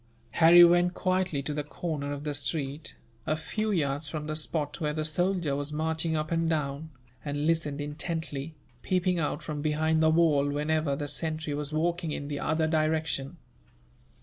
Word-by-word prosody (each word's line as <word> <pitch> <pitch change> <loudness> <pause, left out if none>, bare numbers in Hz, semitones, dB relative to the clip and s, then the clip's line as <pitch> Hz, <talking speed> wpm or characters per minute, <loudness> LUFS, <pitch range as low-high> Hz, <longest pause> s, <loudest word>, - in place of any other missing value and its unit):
Harry 170 +6 +8
went 175 +1 +4
quietly 185 -6 0
to 150 - -3
the 150 0 -2
corner 150 -1 -4
of 145 0 -5
the 150 -1 -2
street, 145 +1 -3 0.3
a 155 - +1
few 215 +7 -3
yards 145 -6 0
from 150 +1 -5
the 155 0 -3
spot 155 0 -2
where 150 -1 0
the 155 0 -2
soldier 175 -1 +1
was 145 +1 -3
marching 160 +1 -1
up 155 +1 -2
and 165 0 +1
down, 150 -1 -2 0.3
and 145 0 -2
listened 155 -3 +1
intently, 150 0 -4 0.3
peeping 180 -1 +1
out 155 0 -2
from 150 -2 -4
behind 155 +1 +1
the 160 - +5
wall 155 -3 +3
whenever 150 0 0
the 145 +1 -4
sentry 155 +1 -1
was 145 0 -3
walking 170 +1 -1
in 145 -1 -4
the 145 -1 -3
other 160 +1 +1
direction. 155 -1 0
155 Hz, 175 wpm, -28 LUFS, 145-165 Hz, 0.3 s, Harry